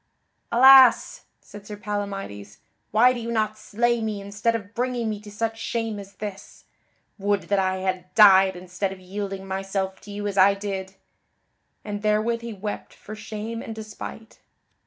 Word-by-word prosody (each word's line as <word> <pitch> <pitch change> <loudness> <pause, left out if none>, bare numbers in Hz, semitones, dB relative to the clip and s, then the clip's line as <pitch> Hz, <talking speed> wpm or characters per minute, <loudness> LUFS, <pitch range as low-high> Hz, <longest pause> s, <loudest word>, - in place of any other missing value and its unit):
"Alas!" 260 0 +7 0.2
said 205 0 -13
Sir 210 - -7
Palamydes, 195 - -5 0.3
"why 245 +4 +5
do 245 - -5
you 230 0 -4
not 215 -2 0
slay 235 +2 0
me 215 -2 -3
instead 205 +3 -1
of 205 -1 -6
bringing 245 -1 -1
me 210 - -5
to 210 0 -12
such 225 +2 -3
shame 225 -3 -3
as 200 0 -11
this! 205 -2 -8 0.5
Would 200 0 0
that 200 -1 +2
I 190 0 +1
had 185 -1 -3
died 190 -3 +7
instead 185 +2 -4
of 195 - -9
yielding 195 +1 -6
myself 190 0 -3
to 205 - -11
you 205 0 -5
as 200 -1 -1
I 195 +1 +6
did." 195 -1 -5 0.9
And 205 -1 -4
therewith 215 +2 +1
he 235 0 -6
wept 210 0 -6
for 215 - -10
shame 220 +1 -6
and 225 - -7
despite. 220 +1 -9
205 Hz, 165 wpm, -24 LUFS, 195-225 Hz, 0.9 s, Alas